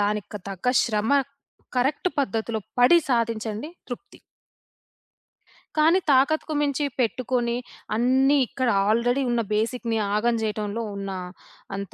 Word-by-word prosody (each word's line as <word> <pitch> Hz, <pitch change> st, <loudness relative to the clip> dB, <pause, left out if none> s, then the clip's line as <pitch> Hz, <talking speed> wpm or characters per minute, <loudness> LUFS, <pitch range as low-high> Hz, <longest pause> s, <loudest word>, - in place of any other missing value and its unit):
దానికి 210 Hz, 0 st, -1 dB
తగ్గ 195 Hz, +3 st, -7 dB, 0.2 s
శ్రమ 215 Hz, +1 st, 0 dB, 0.7 s
కరెక్ట్ 270 Hz, +8 st, +1 dB
పద్ధతిలో 225 Hz, -3 st, -1 dB, 0.2 s
పడి 250 Hz, +8 st, +7 dB
సాధించండి 230 Hz, 0 st, -1 dB, 0.2 s
తృప్తి. 270 Hz, +11 st, -8 dB, 1.6 s
కానీ 325 Hz, +5 st, +5 dB
తాకత్తుకు 310 Hz, +4 st, +3 dB
మించి 285 Hz, 0 st, 0 dB
పెట్టుకొని, 240 Hz, 0 st, 0 dB, 0.4 s
అన్ని 265 Hz, +5 st, +3 dB
ఇక్కడ 260 Hz, -3 st, -1 dB, 0.2 s
ఆల్రెడీ 245 Hz, +5 st, +2 dB
ఉన్న 240 Hz, -1 st, +1 dB
బేసిక్‌ని 225 Hz, +1 st, 0 dB, 0.2 s
ఆగం 230 Hz, +2 st, +2 dB
చేయటంలో 215 Hz, +1 st, -2 dB
ఉన్న 195 Hz, -1 st, -4 dB, 0.7 s
అంత 200 Hz, -2 st, -6 dB
235 Hz, 105 wpm, -25 LUFS, 215-265 Hz, 1.6 s, పడి